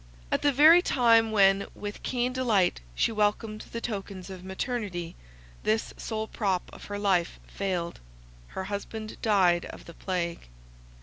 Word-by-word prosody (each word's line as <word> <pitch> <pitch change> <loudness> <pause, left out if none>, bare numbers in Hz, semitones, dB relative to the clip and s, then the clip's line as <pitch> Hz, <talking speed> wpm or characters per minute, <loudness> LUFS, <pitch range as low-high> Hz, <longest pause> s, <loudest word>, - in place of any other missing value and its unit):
At - - +1
the 290 - +4
very 310 +6 +8
time 230 -7 +4
when 195 -2 +4
with 205 0 -6
keen 250 0 -1
delight 220 - +2
she - - +2
welcomed 215 0 0
the 230 - -3
tokens 195 -4 -5
of 185 -1 -9
maternity, 190 -3 -4 0.5
this 220 +1 0
sole 220 -1 -3
prop 195 -5 -2
of - - -11
her 205 - -5
life 190 -4 +1
failed, 180 -3 -3 0.6
her 190 - -1
husband 210 +2 -5
died 185 -5 +3
of - - -10
the 170 - -11
plague. 170 - -3
205 Hz, 145 wpm, -28 LUFS, 185-225 Hz, 0.6 s, very